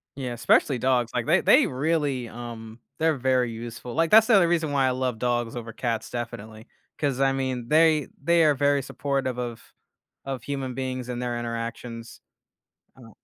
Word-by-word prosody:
Yeah, 130 -3 -4
especially 125 +2 +2
dogs, 125 -2 +1
like, - - -1
they - - +3
they - - +5
really, 140 -3 -1
um, 115 -1 -9 0.2
they're 160 -1 +2
very 130 -2 +1
useful. 120 +1 -7
Like, 165 +1 +1
that's 220 +1 +7
the 225 - +5
only 175 -3 +5
reason 165 -3 0
why 135 -2 +2
I - - +2
love 125 -3 -2
dogs 120 -1 -1
over 115 -1 -6
cats 115 -1 -3
definitely, 110 -2 -7 0.3
'cause 140 -3 -1
I 135 0 +3
mean, 130 -3 -3
they, 155 -2 +4
they 170 +2 +3
are 150 -2 +4
very 140 +1 +2
supportive 135 -2 -2
of 120 -2 -5 0.6
of 135 -4 -5
human 135 -3 -4
beings 130 -1 -4
and 125 0 -4
their 120 -1 -2
interactions. 115 0 -6 0.8
Uh 115 -3 -14
125 Hz, 175 wpm, -25 LUFS, 120-140 Hz, 0.8 s, that's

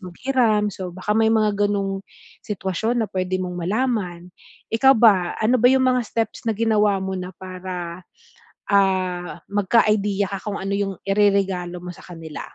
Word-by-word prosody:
maghiram. 215 +2 +1
So 185 -2 -6
baka 185 +4 -2
may 220 0 +4
mga 210 -2 +2
ganong 195 -1 -1 0.4
sitwasyon 215 +4 -1
na - - -5
puwede 185 0 -1
mong 180 -1 -4
malaman. 200 -2 -1 0.5
Ikaw 265 +4 +6
ba 200 -6 +4
ano 235 +4 +3
ba 245 - +6
yung 265 0 +3
mga 255 -1 +3
steps 225 +2 -3
na - - +3
ginawa 210 -3 +2
mo 190 0 -3
na 180 0 -6
para, 185 -2 -6 0.7
ah, 185 -3 +1
magka-idea 205 -1 +2
ka 195 - -2
kung 200 - -3
ano 195 +1 -3
yung 200 -1 -2
ireregalo 195 -3 +1
mo 180 - -6
sa - - -15
kanila? 165 -3 -9
200 Hz, 160 wpm, -22 LUFS, 185-220 Hz, 0.7 s, Ikaw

